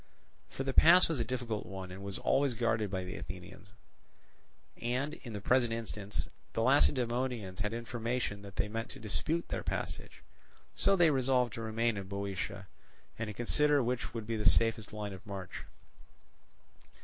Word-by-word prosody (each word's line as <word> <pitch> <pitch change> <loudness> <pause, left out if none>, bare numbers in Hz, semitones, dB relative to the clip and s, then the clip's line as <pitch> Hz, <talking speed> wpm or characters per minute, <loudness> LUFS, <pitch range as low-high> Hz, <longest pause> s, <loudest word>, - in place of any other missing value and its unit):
For 135 - -4
the 135 0 -2
pass 175 +6 +8
was 160 -5 -1
a - - +2
difficult 115 -3 -3
one, 95 -1 -6
and 95 +2 -8
was 100 -1 -2
always 135 -2 +2
guarded 110 -3 +1
by 95 -1 -2
the 90 - -6
Athenians; - - -9 1.1
and, 130 +5 -1
in 120 -7 -8
the 105 - -3
present 120 +2 +3
instance, 105 -3 -3 0.3
the 115 - +1
Lacedaemonians 125 -6 +2
had 105 0 0
information 115 -2 -2
that 100 -1 -11
they - - 0
meant 115 +2 -4
to - - -9
dispute 155 +10 -1
their - - -2
passage. - - -4 0.5
So 195 - +4
they 170 -4 +5
resolved 130 -3 +2
to 115 - -5
remain 115 0 0
in 100 -1 -5
Boeotia, 100 -2 -4 0.5
and 115 - -2
to 105 - -4
consider 145 +4 +3
which 120 0 -1
would 115 -2 -3
be 115 0 -2
the 105 - +5
safest 115 -2 +2
line 105 -2 -4
of 95 - -10
march. 100 -3 -7
115 Hz, 170 wpm, -33 LUFS, 105-125 Hz, 1.1 s, pass